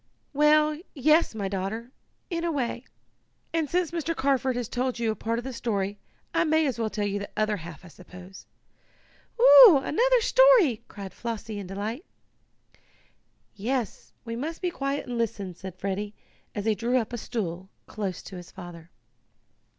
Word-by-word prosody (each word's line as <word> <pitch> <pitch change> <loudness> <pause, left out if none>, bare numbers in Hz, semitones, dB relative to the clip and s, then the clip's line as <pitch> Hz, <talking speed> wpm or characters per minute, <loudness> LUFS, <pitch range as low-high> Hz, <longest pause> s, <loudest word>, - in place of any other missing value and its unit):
"Well, 300 +1 +4 0.2
yes, 305 +3 +3
daughter, 200 +3 -4 0.4
in 335 -1 -2
a 340 - 0
way. 255 -3 -2 0.7
And, 320 -3 0
since 355 -2 0
Mr. 330 -1 -2
Carford 265 -2 +1
has 245 -2 -2
told 255 +1 -2
you 230 -2 0
part 230 +1 -2
of 240 - -4
the 265 - -5
story, 205 -4 -2 0.3
I - - +3
may 315 -1 +2
as 260 -5 -2
well 225 -1 0
tell 210 -1 -2
you 205 0 -1
the 200 - -6
other 215 -1 +1
half, 170 +1 -10
I - - -12
suppose." 180 +2 -13 0.9
"Oh, - - +10
another - - +3
story!" 460 - +5
cried 195 -2 -9
Flossie, 225 -2 -5
in 195 - -7
delight. 210 - -4 1.5
"Yes, 235 +2 -3
we 230 0 -4
must 310 +7 -4
be 360 -2 -1
quiet 275 -2 -3
and 245 -2 -4
listen," 200 -5 -2
said 185 +1 -9
Freddie, 200 +2 -3 0.4
as 205 -1 -3
he 220 - +3
drew 235 +4 0
up 240 -1 -2
a - - -2
stool 190 -5 -4 0.2
close 195 -4 -5
to 190 - -9
his 175 0 -10
father. 175 -2 -11
230 Hz, 165 wpm, -26 LUFS, 200-295 Hz, 1.5 s, Oh